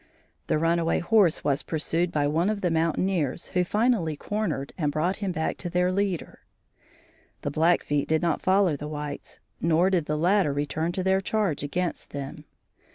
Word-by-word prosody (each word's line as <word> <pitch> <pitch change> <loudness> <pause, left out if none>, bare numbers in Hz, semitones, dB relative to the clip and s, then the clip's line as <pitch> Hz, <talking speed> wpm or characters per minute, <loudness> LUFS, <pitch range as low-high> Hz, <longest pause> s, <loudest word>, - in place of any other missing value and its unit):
The - - +2
runaway 165 +1 +1
horse 195 -3 +3
was 140 0 +1
pursued 165 +2 -1
by 145 -1 +1
one 165 +6 +1
of 215 -2 -2
the 180 - +1
mountaineers 165 -1 0
who 180 - +1
finally 210 -5 +1
cornered 185 -10 -3
and 150 -5 0
brought 170 +6 0
him 200 -3 -2
back 160 -2 -2
to 175 - -5
their 180 +1 +1
leader. 195 -3 -2 1.0
The 145 - -2
Blackfeet 155 -2 +2
did 160 +1 +1
not 170 -2 +1
follow 190 -4 +3
the 150 +1 -6
whites, 150 -1 -6 0.2
nor 170 +3 +3
did 170 -5 +1
the 150 - 0
latter 180 -1 +2
return 150 +4 -1
to 185 - -2
their 190 +1 +2
charge 195 -6 0
against 175 +5 -3
them. 145 +2 -6
170 Hz, 170 wpm, -26 LUFS, 150-185 Hz, 1.0 s, horse